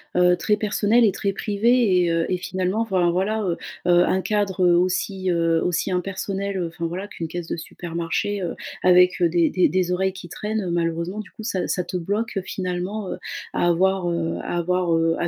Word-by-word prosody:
heu, 180 0 +4
très 210 - +2
personnelle 210 +2 +2
et 210 - +5
très 200 0 -2
privée. 210 -2 +2
Et 170 - +1
heu, 165 0 +1
et 180 - +1
finalement, 185 +3 -2
enfin 185 -6 +2
voilà, 205 +5 0
heu 175 -3 -1 0.3
heu, 175 0 +5
un 190 - +1
cadre, 200 -3 0
heu, 175 -1 +5
aussi, 185 +1 0
heu, 165 -1 +2
aussi 180 +2 0
impersonnel, 195 +1 -2
enfin 165 +1 -5
voilà 185 +5 -4
qu'une 165 -5 -5
caisse 170 +1 -6
de - - -3
supermarché, 170 +4 -3
heu, 175 - -3 0.3
avec, 180 +1 +5
heu, 175 - +5
des 170 -1 +2
des 185 - +3
des 185 -1 0
oreilles 190 +1 0
qui 180 -2 -10
traînent. 210 0 -3
Malheureusement, 170 +3 -1
du 210 - -8
coup 220 - -10
ça 190 -5 -1
ça 180 - 0
te 180 - -4
bloque 200 +4 -2
finalement, 185 +2 -3
heu, - - -4 0.3
à 175 - +1
avoir, 185 +1 +2
heu, 165 -1 -1
à - - -4
avoir, 180 0 +1
heu, 165 0 +2
à 170 - 0
180 Hz, 205 wpm, -23 LUFS, 175-200 Hz, 0.3 s, et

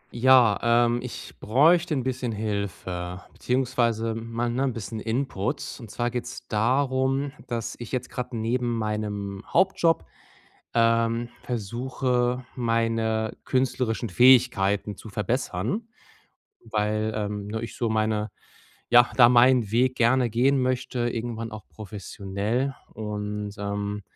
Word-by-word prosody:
Ja, 125 -3 +5 0.3
ähm, 120 +1 +1
ich - - -8
bräuchte 155 - +4
'n 130 - -1
bisschen 130 -1 -2
Hilfe, 95 -4 -4
beziehungsweise 120 -3 0
mal, 115 +1 -3
ne, 125 +3 -1
'n 135 - 0
bisschen 110 -1 -5
Input. 115 -3 -2
Und 115 -4 -10
zwar 120 +3 -2
geht's 125 0 -6
darum, 130 +4 +1 0.2
dass 115 -2 -3
ich 120 - -8
jetzt 125 -1 -3
gerade 125 -1 -4
neben 120 +1 0
meinem 105 -2 -3
Hauptjob, 170 -3 +3 0.7
ähm, 115 0 +2
versuche, 125 +2 -1
meine 115 -2 0
künstlerischen 125 -3 0
Fähigkeiten 105 -3 +4
zu 110 - -10
verbessern, 115 - -2 0.9
weil, 105 +1 0
ähm, 105 -1 -3
ne, 110 +2 -4
ich 115 - -7
so 115 - 0
meine 110 -1 0 0.6
ja, 120 0 +7
da 120 -2 +8
meinen 120 -2 +5
Weg 125 +2 +2
gerne 120 +1 +3
gehen 130 +4 +3
möchte, 125 -1 -1
irgendwann 115 -1 -4
auch 110 -2 -9
professionell 105 +5 -3 0.2
und, 105 -1 -4
ähm 100 0 -3
115 Hz, 120 wpm, -25 LUFS, 105-125 Hz, 0.9 s, da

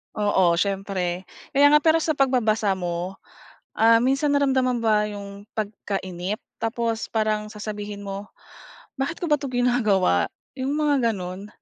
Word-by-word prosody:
Oo, 190 -4 +3
siyempre. 190 -1 -1 0.3
Kaya 285 +1 +5
nga 300 - +6
pero 320 +1 +4
sa 320 -1 0
pagbabasa 225 -8 +2
mo, 175 +1 -4 0.6
ah, 230 +1 +6
minsan 275 +3 +2
naramdaman 260 -3 +2
mo - - -6
ba 210 -1 +3
yung 200 -1 -8
pagkainip 195 -2 -3 0.2
tapos 230 0 -2
parang 215 -1 0
sasabihin 205 -1 -6
mo 200 +1 -5 0.7
"bakit 270 +5 -2
ko 345 - -2
ba 300 - +4
'to 280 - -4
ginagawa?" 220 - +2 0.3
Yung 265 +1 -2
mga 285 -6 +2
gano'n. 185 +1 -6
215 Hz, 140 wpm, -24 LUFS, 195-260 Hz, 0.7 s, nga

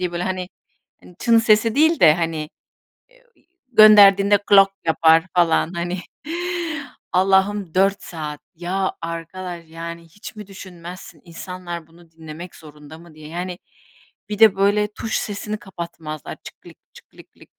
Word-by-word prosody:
diye. 175 -1 -3
Hani, 185 -1 -3 0.7
"çın" 230 -1 +4
sesi 220 0 +3
değil 315 +3 +3
de, 155 -2 +7
hani, 165 -2 -3 0.6
eee, - - -26 0.5
gönderdiğinde 205 -2 +7
"glok" 195 -1 +6 0.2
yapar 160 +1 +4
falan 170 -1 +2
hani. 175 +2 -3 1.1
Allah'ım 190 -1 +2
4 195 +1 +2
saat. 150 -3 -7
Ya, 185 +3 -2
arkadaş! 170 +1 -7
Yani 170 +1 -8
hiç 205 +7 -12
mi 210 -1 -9
düşünmezsin, 185 -2 -11
"İnsanlar 175 -1 -8
bunu 165 0 -21
dinlemek 160 +2 -10
zorunda 150 0 -14
mı?" 170 -1 -16
diye. 155 0 -12
Yani, 175 +2 -5 0.7
bir 210 -1 -5
de 215 -3 +6
böyle 205 +1 +2
tuş 220 - -3
sesini 210 +1 -4
kapatmazlar 170 -6 -8
"çık - - -12
klik - - -16 0.2
çık - - -17
klik - - -19
lik - - -27
lik" - - -18
180 Hz, 140 wpm, -21 LUFS, 165-200 Hz, 1.1 s, de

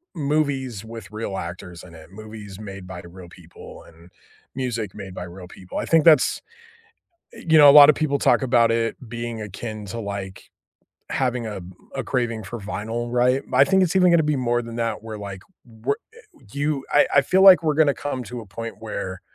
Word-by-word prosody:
movies 140 - -1
with 110 -4 -10
real 105 -3 -5
actors 85 0 -7
in 85 -3 -14
it. 80 +2 -15
Movies 105 -1 -10
made 95 -3 -9
by 90 -1 -8
real 85 0 -13
people 85 -2 -14
and 85 +2 -19 0.4
music 120 -6 -3
made 95 -3 -9
by - - -5
real 90 +1 -10
people. 90 0 -10
I - - -2
think 165 -2 +3
that's 155 -5 +5 1.0
e - - -12
you 160 - +7
know, 145 -1 +9
a - - +9
lot 145 0 +10
of - - 0
people 145 -2 0
talk - - +3
about 120 -3 +3
it 115 0 0
being 115 -1 -5
akin 105 +1 -7
to, 100 +4 -6
like, 100 -2 -7 0.6
having 125 -3 -1
a 105 -3 -6 0.3
a 135 - -3
craving 120 -4 -2
for 120 +5 -7
vinyl, 115 +3 -5
right? 125 +2 +2
But - - -2
I - - +8
think 190 0 +3
it's 175 -1 0
even 180 -1 +5
gonna 170 -1 +4
be 150 -1 0
more 120 -2 0
than 115 0 -8
that 115 -2 -2
where, 110 -1 -7
like, 100 -2 -8 0.4
w 140 - +2 0.2
eh - - -20 0.4
you 145 -1 -2
I 145 - +5
I 140 - +8
feel 185 +7 +2
like 185 -3 +9
we're 155 -2 +1
gonna 155 -2 +4
come 140 -3 -4
to 120 +3 -7
a 110 - -12
point 115 +5 -7
where 95 -4 -6
115 Hz, 210 wpm, -22 LUFS, 100-140 Hz, 1.0 s, lot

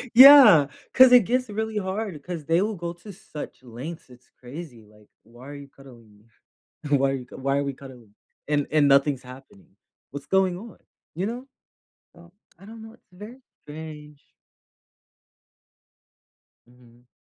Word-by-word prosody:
yeah, 255 - +9 0.3
'cause 260 -1 +7
it 250 -2 +7
gets 255 0 0
really 220 +1 -4
hard 200 +1 -4
'cause 170 -3 -7
they 165 +3 +1
will 215 +1 -2
go 170 -1 -6
to 175 +4 -13
such 155 -7 -11
lengths, 130 +8 -10
it's 125 0 -20
crazy, 130 -2 -11
like, 105 0 -22 0.2
"Why 120 +4 -16
are 145 - -9
you 140 0 -11
cuddling 125 -5 -18
me? 105 - -26 0.7
Why 135 0 +1
are - - -3
you 125 - -13
c - - -14
why 135 +1 -2
are 140 - -2
we 140 - -3
cuddling?" 125 -6 -15 0.3
And 145 -1 0
and 150 -2 +3
nothing's 140 -1 +2
happening, 125 -7 -16 0.4
what's 140 0 -9
going 190 -2 +1
on? 220 -1 -13 0.4
You 185 - -2
know? 240 +3 -5 0.7
So, 170 0 -19 0.3
I - - -16
don't 225 0 -12
know, 220 0 -12
it's - - -28 0.2
very 245 +4 -13 0.2
strange. 150 -1 -11 2.5
Mhm. 120 0 -23
150 Hz, 160 wpm, -24 LUFS, 130-195 Hz, 2.5 s, yeah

